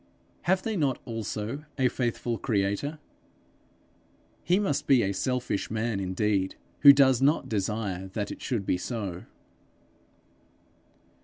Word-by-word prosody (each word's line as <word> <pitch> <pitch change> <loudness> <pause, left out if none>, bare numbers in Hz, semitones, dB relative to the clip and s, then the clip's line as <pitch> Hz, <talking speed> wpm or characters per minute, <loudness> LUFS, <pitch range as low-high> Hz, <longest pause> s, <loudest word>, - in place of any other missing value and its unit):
Have 185 0 +3
they 220 -1 -2
not 140 -8 0
also 115 +4 -4
a 130 -2 +3
faithful 120 -2 -2
creator? 100 +10 -1 1.5
He 180 - +3
must 145 -9 -1
be 130 -4 +5
a 100 0 0
selfish 125 0 -2
man 110 -1 -1
indeed 95 0 0 0.2
who 145 - +10
does 135 -3 +4
not 145 +4 +3
desire 100 -2 -2
that 105 -2 -3
it - - -8
should 115 -7 -2
be 90 - 0
so. 100 -6 -5
115 Hz, 125 wpm, -27 LUFS, 100-135 Hz, 1.5 s, who